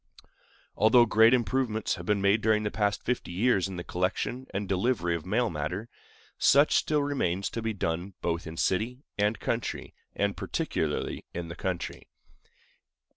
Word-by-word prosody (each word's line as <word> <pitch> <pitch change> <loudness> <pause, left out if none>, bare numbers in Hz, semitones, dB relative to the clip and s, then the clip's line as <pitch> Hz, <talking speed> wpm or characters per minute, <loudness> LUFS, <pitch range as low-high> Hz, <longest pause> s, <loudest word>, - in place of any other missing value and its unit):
Although 115 +3 +6
great 110 +1 +5
improvements 120 -3 +1
have - - -7
been 105 -2 +1
made 100 +3 +4
during 110 0 +2
the 105 - -1
past 105 0 0
fifty 125 -7 -2
years 100 0 +2
in 95 - -7
the 90 - -5
collection 95 +9 -2
and 100 +1 -3
delivery 95 -2 +1
of 85 +1 -6
mail 115 +4 +1
matter, 85 +9 -4 0.7
much 145 +2 +5
still 150 -2 +2
remains 100 -10 -1
to 115 - -4
be 110 0 -1
done 90 0 -3
both 85 0 -2
in 80 0 -8
city 120 - 0 0.2
and 105 +2 +1
country, - - -3 0.2
and 100 -1 0
particularly - - -2
in 85 -1 -4
the 85 - -6
country. 95 -2 -4
105 Hz, 160 wpm, -28 LUFS, 90-115 Hz, 0.7 s, Although